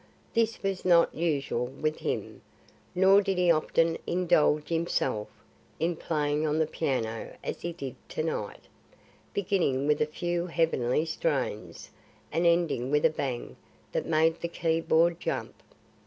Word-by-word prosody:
This 230 Hz, -1 st, 0 dB
was 195 Hz, -1 st, -2 dB
not 170 Hz, -2 st, +4 dB
usual 140 Hz, -7 st, -1 dB
with 155 Hz, +4 st, -3 dB
him. -, -, -4 dB, 0.5 s
Nor 190 Hz, +2 st, +6 dB
did 195 Hz, -2 st, -1 dB
he 180 Hz, -1 st, +4 dB
often 165 Hz, +1 st, +2 dB
indulge 155 Hz, -4 st, +2 dB
himself 165 Hz, -9 st, 0 dB, 0.5 s
in 170 Hz, +1 st, 0 dB
playing 150 Hz, -2 st, -1 dB
on 150 Hz, +1 st, 0 dB
the 160 Hz, -, +3 dB
piano 125 Hz, -8 st, -3 dB
as -, -, -4 dB
he 170 Hz, -, -3 dB
did 140 Hz, -7 st, -6 dB, 0.2 s
to -, -, -2 dB
night, -, -, -3 dB, 0.7 s
beginning 175 Hz, -9 st, 0 dB
with 150 Hz, 0 st, +2 dB
a 150 Hz, -, +3 dB
few 175 Hz, +2 st, -2 dB
heavenly 160 Hz, -5 st, +1 dB
strains 130 Hz, -, -3 dB, 0.4 s
and 170 Hz, +2 st, +2 dB
ending 170 Hz, -7 st, +2 dB
with 150 Hz, +1 st, +2 dB
a -, -, +5 dB
bang 130 Hz, -5 st, -4 dB, 0.3 s
that -, -, -2 dB
made 160 Hz, +1 st, +2 dB
the 170 Hz, -, -1 dB
key 165 Hz, -1 st, 0 dB
board 165 Hz, +1 st, +3 dB
jump. -, -, -3 dB
160 Hz, 145 wpm, -28 LUFS, 145-170 Hz, 0.7 s, Nor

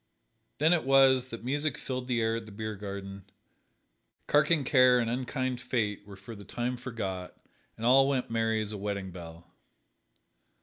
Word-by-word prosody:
Then 160 Hz, +4 st, +4 dB
it 170 Hz, -, +1 dB
was 135 Hz, -1 st, +5 dB
that 115 Hz, -2 st, -8 dB
music 145 Hz, +3 st, -1 dB
filled 130 Hz, -1 st, -5 dB
the 120 Hz, -2 st, 0 dB
air 110 Hz, 0 st, +1 dB
at 115 Hz, -1 st, -8 dB
the -, -, -11 dB
beer 110 Hz, +1 st, -5 dB
garden, 100 Hz, -1 st, -7 dB, 1.0 s
carking 150 Hz, 0 st, +3 dB
care 125 Hz, -1 st, +5 dB
and 115 Hz, -1 st, 0 dB
unkind 130 Hz, 0 st, -2 dB
fate 105 Hz, -5 st, -2 dB
were 100 Hz, -, -10 dB
for 100 Hz, +4 st, -10 dB
the 100 Hz, -, -11 dB
time 120 Hz, +5 st, -3 dB
forgot, 95 Hz, -8 st, -5 dB, 0.4 s
and 115 Hz, -, -5 dB
all 135 Hz, +2 st, +6 dB
went 130 Hz, -4 st, -1 dB
merry 115 Hz, -1 st, +1 dB
as 105 Hz, -, -7 dB
a 105 Hz, -, -6 dB
wedding 100 Hz, -2 st, -4 dB
bell. 85 Hz, -1 st, -11 dB
115 Hz, 170 wpm, -29 LUFS, 100-130 Hz, 1.0 s, all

